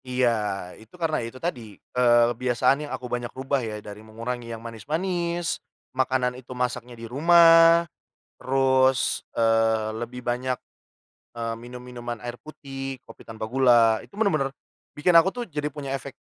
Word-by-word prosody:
Iya 125 0 +2 0.5
itu 110 +9 -17
karena 160 -2 +1
itu 115 - -10
tadi, 155 -9 -2 0.3
eee, 120 -1 +5
kebiasaan 125 +2 +2
yang 150 - -7
aku 130 - -9
banyak 120 -1 -2
ubah 135 0 0
ya, 105 - -5
dari 105 0 -9
mengurangi 115 +2 -6
yang - - -5
manis-manis, 170 - -2 0.3
makanan 130 -1 +1
itu 130 0 -10
masaknya 125 -1 -3
di 115 - -8
rumah, 165 +5 +6 0.5
terus, 130 0 +2
eee, 115 -1 +2
lebih 125 +1 -6
banyak, 125 +1 -1 0.8
eee, 115 0 -2
minum-minuman 120 0 -8
air 120 +2 -6
putih, 135 -3 -7
kopi 115 - -14
tanpa 110 -1 -6
gula, 120 -2 +4
itu - - -17
bener-bener 155 -11 +1 0.4
bikin 160 +4 +1
aku 165 +2 +7
tuh 245 +3 -5
jadi 150 -4 -3
punya 140 -3 -5
efek 135 0 -6
125 Hz, 145 wpm, -25 LUFS, 120-145 Hz, 0.8 s, aku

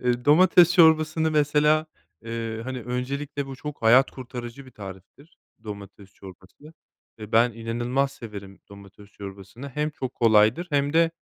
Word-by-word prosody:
eee, 125 0 -1
domates 175 +3 +5
çorbasını, 160 -1 +4
mesela, 150 +1 +2 0.4
eee, 115 -1 -5
hani, 130 -1 -5
öncelikle 140 +3 -4
bu 135 -1 -8
çok 150 -1 -8
hayat 125 +4 +5
kurtarıcı 125 0 -9
bir - - -14
tariftir. 100 - -13 0.3
Domates 100 -1 -10
çorbası 95 - -15 0.5
ve 105 0 -10
ben 120 +1 +4
inanılmaz 120 +4 -2
severim 100 -4 -10
domates 100 0 -15
çorbasını 100 +7 -10
hem 150 +3 -2
çok 130 -3 -6
kolaydır 110 +8 +3
hem 145 0 0
de, 165 0 +3
125 Hz, 140 wpm, -24 LUFS, 110-150 Hz, 0.5 s, domates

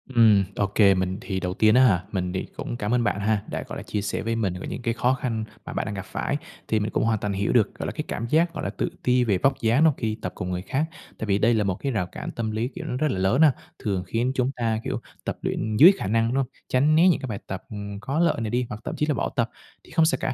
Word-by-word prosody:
Ừm, 110 -4 +6
ô 100 - +1
kê. 100 0 +5
Mình 95 +1 -1
thì, 95 -1 -3
đầu 90 0 -2
tiên 110 +2 +4
á 130 - +7
hả, 90 -8 +4
mình 90 -2 -2
thì 95 - -3
cũng 120 - -4
cảm 105 +1 -1
ơn 120 -1 +3
bạn 100 - 0
ha, 105 0 +1
đã, - - -3
gọi - - -6
là, - - -6
chia 105 - -3
sẻ 100 - -2
với 115 +1 -1
mình 100 -6 0
về - - -6
những - - -5
cái 115 -1 0
khó 125 +2 +2
khăn 120 -4 -2 0.2
mà - - -6
bạn - - -1
đang 105 - -4
gặp 95 - -5
phải, 140 - -2 0.3
thì 110 - +2
mình 105 +1 -2
cũng - - +1
hoàn 110 -1 +1
toàn 105 0 -2
hiểu 100 +1 0
được, 115 -5 +3
gọi - - -5
là, - - -2
cái - - -4
cảm 115 - -3
giác, 165 +2 +3
gọi 155 - -5
là, - - -1
tự 100 - -2
ti 125 0 +3
về 100 -5 +2
vóc 135 +6 +1
dáng 115 +6 +3
đó 160 -3 +6
khi 110 -1 -2
tập 90 - -3
cùng 90 - -4
người 90 - -2
khác. 135 +10 -1 0.3
Tại - - -4
vì 100 -1 +3
đây 115 +3 +3
là 110 - +2
một 95 -2 0
cái 135 +7 -3
rào 100 -7 -1
cản - - -6
tâm 110 -2 -3
lý, 110 +3 -1
kiểu, 175 -3 -6
nó 125 - -3
rất 155 +3 +1
là 95 - -2
lớn 95 +10 +2
ha, 155 -3 +7 0.3
thường 95 -4 -1
khiến 120 +6 0
chúng 130 +1 +1
ta, 115 -2 0
kiểu, - - -2 0.2
tập - - -3
luyện 110 -1 -2
dưới 170 - +10
khả 100 - -3
năng 115 +2 +2
nó, 135 0 +1 0.2
tránh 145 +5 +3
né 170 +3 +6
những 175 - +4
cái 130 - -4
bài 105 -4 -4
tập, 95 -1 -5
ừm, 100 -1 -6
có 135 +8 -2
lợi 165 -8 +2
này 110 - -2
đi, 125 +2 0
hoặc 105 +1 -6
thậm - - -4
chí 150 - 0
là 150 - +1
bỏ 115 - -1
tập. - - +1 0.3
Thì - - -18
không 160 0 +4
sao 165 - +2
cả, - - -1
110 Hz, 315 wpm, -25 LUFS, 100-130 Hz, 0.3 s, dưới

